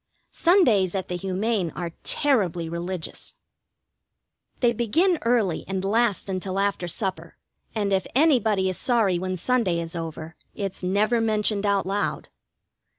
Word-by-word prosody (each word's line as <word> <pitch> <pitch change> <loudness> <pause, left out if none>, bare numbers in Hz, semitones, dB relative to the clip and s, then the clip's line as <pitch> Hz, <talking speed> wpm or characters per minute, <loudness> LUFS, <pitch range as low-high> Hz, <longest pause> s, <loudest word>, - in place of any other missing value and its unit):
Sundays 240 - +3
at 190 - -3
the 180 - -2
Humane 190 +1 -1
are 170 -1 -4
terribly 190 - +1
religious. 170 +1 -5 1.2
They 240 -2 +3
begin 320 - +2
early 230 -8 +1
and 190 0 -2
last 215 -1 +1
until 190 0 -3
after 200 -3 0
supper, 170 -3 -3 0.4
and 205 -2 0
if 190 -1 +1
anybody 230 -10 +3
is 185 - -2
sorry 220 -8 +2
when 185 0 -3
Sunday 195 -4 +1
is 165 0 -5
over, 165 -1 -6 0.2
it's 195 -2 -4
never 205 +6 +2
been 225 0 +1
mentioned 210 -1 +1
out 200 -2 +2
loud. 200 +2 -2
195 Hz, 140 wpm, -25 LUFS, 180-225 Hz, 1.2 s, Sundays